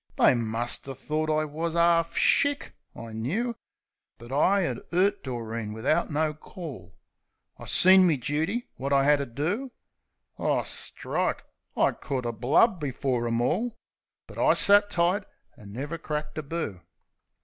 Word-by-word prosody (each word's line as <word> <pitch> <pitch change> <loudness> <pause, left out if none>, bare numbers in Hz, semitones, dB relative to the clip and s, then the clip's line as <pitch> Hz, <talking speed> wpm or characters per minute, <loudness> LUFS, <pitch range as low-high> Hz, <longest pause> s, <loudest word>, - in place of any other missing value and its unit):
They - - +5
muster 120 +3 -2
thort 155 +4 -2
I 155 0 +1
wus 160 +3 -3
'arf 170 0 +3
shick, 285 0 +2 0.2
I 115 -1 -9
knoo. 195 - -2 0.6
But 120 +2 -12
I 190 +8 +3
'ad 125 -6 -3
'urt 195 +4 +2
Doreen 115 -4 -4
wivout 155 +10 0
no 155 0 0
call; 155 -1 -10 0.6
I - - -10
seen 185 0 +6
me 160 -4 +2
dooty, 160 - -1 0.2
wot 135 +2 -3
I 135 -1 +4
'ad 145 - +4
to 140 - -3
do. 180 - -3 0.7
O, - - +1
strike! - - -2 0.3
I - - +4
could 130 -4 -4
'a' 120 - -1
blubbed 145 - +3
before 130 -4 -1
'em 115 0 0
all! 230 - -1 0.5
But - - -11
I - - +4
sat 205 0 +5
tight, 180 +3 +1 0.3
an' 105 -4 -13
never 145 +9 -5
cracked 150 -1 -4
a - - -2
boo. 145 - -5
150 Hz, 150 wpm, -27 LUFS, 125-175 Hz, 0.7 s, seen